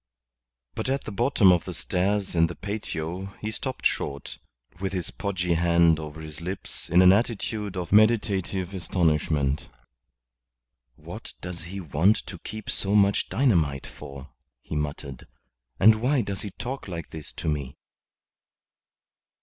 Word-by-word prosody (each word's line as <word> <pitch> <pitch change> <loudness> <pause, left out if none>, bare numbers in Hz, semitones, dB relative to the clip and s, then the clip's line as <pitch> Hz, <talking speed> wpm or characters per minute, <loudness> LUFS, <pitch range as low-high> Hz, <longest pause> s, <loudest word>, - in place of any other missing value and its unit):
But - - -3
at 135 +1 0
the - - -6
bottom 115 -3 +4
of 90 -2 +2
the - - -5
stairs 100 +2 0
in 85 0 +5
the 85 - -7
patio 95 -2 -4
he 110 - -3
stopped 130 +4 -5
short, 70 -1 -1 0.4
with 95 0 -2
his 90 -3 -3
podgy 90 -4 -1
hand 85 -1 +4
over 75 0 -7
his 80 +1 -8
lips 95 +3 -4
in 90 +2 +6
an 90 +1 +8
attitude 105 -2 -1
of 90 -2 -4
meditative 100 -4 +3
astonishment. 75 -6 0 1.3
"What - - -9
does 85 -1 -6
he 95 +3 -6
want 90 +5 +3
to 90 - -8
keep 110 +4 -8
so 100 +1 +2
much 100 -1 +3
dynamite 80 - +2
for?" 70 0 -10 0.3
he - - -5
muttered. 75 -2 -4 0.5
"And 110 +2 +6
why 130 +2 +3
does 100 -4 -4
he 105 - -5
talk 125 +7 -6
like 85 -4 -6
this 80 -2 -7
to - - -6
me?" 70 -3 -2
90 Hz, 145 wpm, -26 LUFS, 80-105 Hz, 1.3 s, an